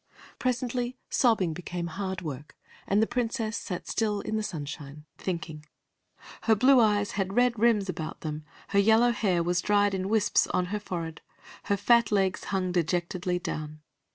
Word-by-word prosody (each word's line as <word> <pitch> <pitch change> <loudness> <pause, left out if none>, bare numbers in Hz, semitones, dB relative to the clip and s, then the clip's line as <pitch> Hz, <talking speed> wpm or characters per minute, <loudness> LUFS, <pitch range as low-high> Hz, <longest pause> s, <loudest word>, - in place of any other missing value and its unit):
Presently 250 0 -1
sobbing 215 -9 +3
became 175 +1 -5
hard 190 +2 -4
work, 150 -2 -7 0.3
and 205 +2 +3
the - - +3
Princess 230 -2 -2
sat 180 -5 -5
still 210 -2 0
in 220 - -3
the 215 - 0
sunshine, 150 -5 -6
thinking. 165 -4 -4 0.8
Her 225 - +5
blue 255 +4 +6
eyes 210 -3 +3
had 195 0 -2
red 245 -2 +3
rims 220 -3 +3
about 165 -4 -5
them, 155 -1 -4 0.3
her 200 - +3
yellow 220 +4 +5
hair 190 -7 +1
was 175 +1 +1
dried 205 -1 +2
in 190 0 -2
wisps 215 -1 +3
on 180 - 0
her 210 - 0
forehead, 165 -5 -5 0.4
her 200 - +1
fat 235 +1 +4
legs 195 -2 +1
hung 185 -2 -1
dejectedly 180 +1 0
down. 155 -3 -5
195 Hz, 160 wpm, -28 LUFS, 175-220 Hz, 0.8 s, blue